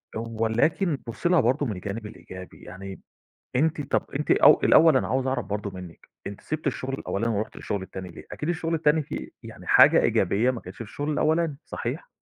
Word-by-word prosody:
ولكن 115 - 0
بُصي 115 +9 -2
لها 180 - +5
برضه 130 +5 +1
من 110 -6 -3
الجانب 105 +4 -6
الإيجابي 95 -3 -11
يعني 95 0 -9 0.6
أنتِ 155 +2 +1
طب 140 - -1
أنتِ 150 - -3
أو - - +6
الأول 160 -3 +6
أنا - - 0
عاوز 130 0 0
أعرف 130 0 -1
برضه 105 0 -3
منك، 90 -3 -11 0.2
أنتِ 100 0 -7
سِبتِ 155 0 -5
الشغل 135 -1 -2
الأولاني 115 -3 -2
ورُحتِ 105 +2 -3
الشغل 100 -2 -4
التاني 95 -1 -8
ليه؟ 85 - -12
أكيد 150 - -4
الشغل 165 -1 -1
التاني 155 0 +2
فيه - - -6
يعني - - -11
حاجة - - +7
إيجابية 115 +6 +2
ما 125 -3 -5
كانتش 90 - -11
في 115 - -5
الشغل 145 +7 -4
الأولاني، 155 0 +1
صحيح؟ - - -5
125 Hz, 190 wpm, -25 LUFS, 100-150 Hz, 0.6 s, حاجة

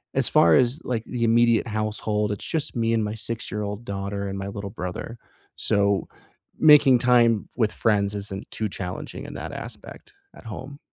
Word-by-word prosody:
as - - +2
far 85 -1 +5
as, 130 +6 +2
like, 115 -3 -2
the 120 -2 -3
immediate 115 +1 +3
household, 105 -1 -1
it's 105 - -5
just 160 -3 -2
me 115 -1 +1
and 110 -1 +1
my 105 +1 -3
six-year-old 105 -1 -4
daughter 100 0 -4
and 95 0 -4
my 95 - -4
little 100 0 -6
brother. 90 +6 -6 0.4
So, 100 -1 +1 0.5
making 145 -5 +7
time 120 -3 +3
with 110 -3 +2
friends 105 -2 +1
isn't 100 -1 -6
too 110 -1 -2
challenging 90 -1 -6
in - - -8
that - - -6
aspect - - -9 0.2
at - - -15
home. 130 +6 -8
110 Hz, 170 wpm, -24 LUFS, 100-120 Hz, 0.5 s, making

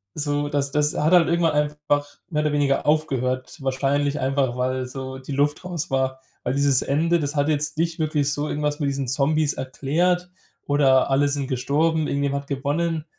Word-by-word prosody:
so, 145 -1 -1
das 140 -1 -1
das 150 +1 +1
hat 155 +4 +2
halt 175 -2 +6
irgendwann 170 -2 +2
einfach 150 -1 0 0.2
mehr 150 -4 0
oder 150 - +1
weniger 145 -2 +1
aufgehört, 130 -4 0
wahrscheinlich 140 +2 0
einfach, 130 -2 0
weil 130 0 -1
so 130 0 -7
die 130 +2 -9
Luft 145 +4 0
raus 175 -2 -4
war, 130 0 0 0.2
weil 125 - -1
dieses 140 -2 +3
Ende, 165 +4 +1
das 145 0 -3
hat 145 0 +1
jetzt 150 +1 +1
nicht 165 0 0
wirklich 150 -2 0
so 145 +1 -2
irgendwas 150 0 -2
mit 145 - +1
diesen 135 -1 -3
Zombies 145 +4 +1
erklärt 175 +7 -1 0.4
oder 135 -2 +3
alle 145 +2 +3
sind 140 -1 -2
gestorben, 150 +5 0
irgendjemand 140 0 -1
hat 140 - -25
gewonnen. 150 +4 -1
145 Hz, 180 wpm, -23 LUFS, 135-150 Hz, 0.4 s, halt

